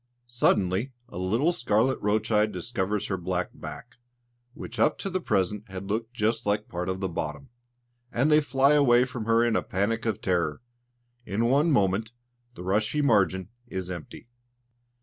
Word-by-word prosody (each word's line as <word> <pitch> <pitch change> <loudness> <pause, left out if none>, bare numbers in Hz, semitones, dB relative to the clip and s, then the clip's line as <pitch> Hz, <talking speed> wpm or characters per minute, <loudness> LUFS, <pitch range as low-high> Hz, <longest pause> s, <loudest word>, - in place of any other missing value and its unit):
Suddenly 120 -1 +1 0.2
a 90 - -7
little 115 - +2
scarlet 120 -3 +1
roach 110 +2 0
eye 105 0 +4
discovers 100 0 -2
her 95 - -2
black 90 0 -2
back, 120 +1 -9 0.6
which 115 0 -8
up 115 - +3
to 195 - -4
the 185 0 -1
present 100 - -1
had 95 0 -6
looked 115 +2 -2
just 115 0 0
like 105 +1 0
part 90 +1 -4
of 95 +1 -3
the 95 - 0
bottom, 75 - -5 0.6
and 135 +6 +2
they 150 +1 +6
fly 140 0 +3
away 125 -4 +5
from 125 -4 -6
her 115 +1 +4
in 120 -1 +2
a - - +2
panic 115 +5 -1
of 110 -2 -1
terror. 85 -3 -1 0.6
In 110 +1 -1
one 145 +5 +4
moment 105 0 +1 0.4
the 90 - -8
rushy 110 +10 +1
margin 95 -6 +2 0.2
is 95 -5 -4
empty. 85 +5 -8
110 Hz, 170 wpm, -27 LUFS, 95-120 Hz, 0.6 s, they